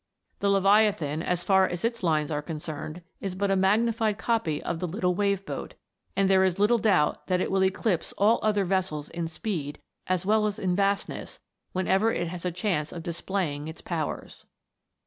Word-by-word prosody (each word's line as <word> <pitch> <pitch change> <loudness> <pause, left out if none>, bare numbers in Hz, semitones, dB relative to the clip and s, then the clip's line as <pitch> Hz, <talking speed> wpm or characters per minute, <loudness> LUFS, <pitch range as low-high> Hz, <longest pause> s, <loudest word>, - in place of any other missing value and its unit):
The 200 - +1
Leviathan, 195 -6 +3
as 175 0 -1
far 190 -1 +4
as 175 +4 -3
its 230 0 -1
lines 155 -4 +1
are 150 -1 -1
concerned, 155 +1 -6 0.2
is 195 -2 -4
but 200 +1 0
a - - +3
magnified 215 +2 +2
copy 225 -10 0
of 170 -1 -3
the 180 - -2
little 180 +1 0
Wave 200 0 0
boat; - - -6 0.4
and 195 -1 +3
there 190 0 +5
is 185 -2 +1
little 215 +4 +4
doubt 190 -9 +2
that 180 -1 +2
it - - -1
will 190 0 +3
eclipse 190 -1 0
all 215 +4 +4
other 205 -2 +2
vessels 175 -5 -1
in 170 -1 -3
speed, 160 -4 -4 0.3
as 185 0 0
well 215 +1 +3
as 210 0 -3
in 185 -4 0
vastness, 200 +1 -1 0.3
whenever 190 +4 +2
it 170 -5 -2
has 180 0 -7
a 180 - 0
chance 175 -4 -1
of 170 - -7
displaying 170 -3 -2
its 160 - -8
powers. 160 -4 -4
190 Hz, 185 wpm, -27 LUFS, 170-200 Hz, 0.4 s, there